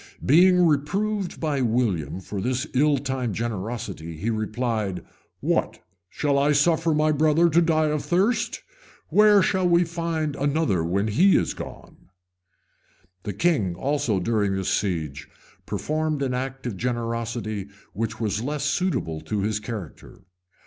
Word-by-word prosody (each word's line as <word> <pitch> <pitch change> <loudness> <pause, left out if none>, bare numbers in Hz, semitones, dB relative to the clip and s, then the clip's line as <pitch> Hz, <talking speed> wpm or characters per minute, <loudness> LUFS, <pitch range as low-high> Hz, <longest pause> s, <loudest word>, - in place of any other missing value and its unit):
Being 180 +4 +6
reproved 190 +7 0
by 150 -4 -1
William 105 - 0
for 100 +1 -5
this 130 +5 -1
ill 145 +2 +3
timed 130 -5 -3
generosity, 105 -6 -4
he 110 +8 -1
replied, 110 -3 -2 0.4
"What, - - 0 0.3
shall 140 -2 0
I 145 +2 +3
suffer 160 +2 +2
my 155 +1 +3
brother 155 +3 +3
to 170 +3 +5
die 160 -2 +2
of 150 -1 -1
thirst? 220 +7 0 0.5
Where 210 -2 +6
shall 185 -2 +1
we 170 0 +5
find 165 -3 -2
another 140 - +1
when 95 +5 0
he 180 - +5
is - - 0
gone?" - - -11 1.1
The 100 - -5
king 105 - +1
also, 130 -2 0
during 100 0 0
this 95 -1 -2
siege, 80 -7 -2 0.4
performed 155 -1 -1
an 130 -2 -1
act 130 +1 -4
of 115 -6 -4
generosity 115 -3 -3 0.3
which 110 0 -3
was 105 -2 -1
less 145 +3 -3
suitable 145 - -1
to 105 -2 -2
his 105 +1 -1
character. 105 -7 -8
130 Hz, 140 wpm, -24 LUFS, 105-155 Hz, 1.1 s, Being